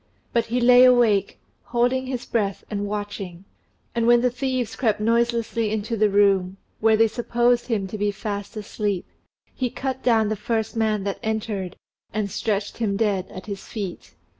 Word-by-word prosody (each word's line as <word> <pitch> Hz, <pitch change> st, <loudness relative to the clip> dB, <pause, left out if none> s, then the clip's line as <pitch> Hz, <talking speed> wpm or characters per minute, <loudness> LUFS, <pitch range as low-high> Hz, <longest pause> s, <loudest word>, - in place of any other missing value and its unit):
But 230 Hz, -1 st, +1 dB
he 240 Hz, +2 st, 0 dB
lay 250 Hz, +1 st, +7 dB
awake, 235 Hz, -6 st, +4 dB, 0.3 s
holding 250 Hz, +2 st, +1 dB
his 255 Hz, -2 st, -4 dB
breath 200 Hz, -4 st, -1 dB
and 205 Hz, -1 st, -2 dB
watching; 200 Hz, -3 st, -5 dB, 0.5 s
and 235 Hz, -1 st, +1 dB
when 240 Hz, 0 st, +6 dB
the 250 Hz, 0 st, +2 dB
thieves 255 Hz, -1 st, -2 dB
crept 220 Hz, -6 st, +1 dB
noiselessly 230 Hz, 0 st, +1 dB
into 220 Hz, +2 st, -2 dB
the 215 Hz, -1 st, +3 dB
room, 195 Hz, -2 st, +3 dB, 0.2 s
where 220 Hz, 0 st, +4 dB
they 225 Hz, +1 st, +5 dB
supposed 240 Hz, +1 st, +1 dB
him 220 Hz, -5 st, 0 dB
to 205 Hz, +2 st, -6 dB
be 205 Hz, 0 st, +1 dB
fast 205 Hz, +1 st, -5 dB
asleep, 205 Hz, -2 st, -2 dB, 0.5 s
he 255 Hz, -2 st, -1 dB
cut 265 Hz, +1 st, -4 dB
down 225 Hz, -3 st, +3 dB
the 215 Hz, -, 0 dB
first 220 Hz, +2 st, -2 dB
man 215 Hz, -3 st, +1 dB
that 200 Hz, -1 st, -3 dB
entered, 215 Hz, -5 st, -3 dB, 0.4 s
and 210 Hz, -2 st, -2 dB
stretched 205 Hz, +1 st, -2 dB
him 205 Hz, -4 st, 0 dB
dead 200 Hz, -4 st, 0 dB
at 185 Hz, -2 st, -9 dB
his 200 Hz, -2 st, -6 dB
feet. 200 Hz, -5 st, -6 dB
220 Hz, 170 wpm, -23 LUFS, 205-235 Hz, 0.5 s, lay